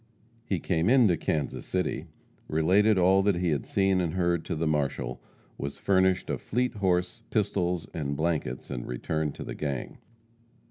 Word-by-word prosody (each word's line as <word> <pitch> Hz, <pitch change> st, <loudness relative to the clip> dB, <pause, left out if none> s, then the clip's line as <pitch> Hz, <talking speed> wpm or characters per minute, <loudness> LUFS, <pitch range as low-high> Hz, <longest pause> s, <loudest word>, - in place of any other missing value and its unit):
He 95 Hz, -, 0 dB
came 85 Hz, +2 st, +1 dB
into 120 Hz, -8 st, +5 dB
Kansas 80 Hz, -3 st, -2 dB
City, 90 Hz, 0 st, -2 dB, 0.4 s
related 95 Hz, +7 st, +3 dB
all 95 Hz, +2 st, +5 dB
that 100 Hz, -1 st, +2 dB
he 90 Hz, 0 st, 0 dB
had 70 Hz, -4 st, -1 dB
seen 95 Hz, -2 st, +2 dB
and 85 Hz, -1 st, -2 dB
heard 85 Hz, -2 st, +1 dB
to -, -, -2 dB
the 80 Hz, +1 st, -1 dB
marshal; 75 Hz, -3 st, -1 dB, 0.4 s
was 70 Hz, 0 st, -4 dB
furnished 95 Hz, -1 st, +2 dB
a -, -, -2 dB
fleet 125 Hz, +3 st, -1 dB
horse, 90 Hz, -2 st, 0 dB
pistols 90 Hz, -5 st, 0 dB
and 70 Hz, -3 st, -3 dB
blankets, 80 Hz, -6 st, -2 dB
and -, -, -4 dB
returned 75 Hz, +4 st, -2 dB
to -, -, -6 dB
the -, -, -6 dB
gang. 70 Hz, -4 st, -4 dB
90 Hz, 160 wpm, -28 LUFS, 75-95 Hz, 0.4 s, into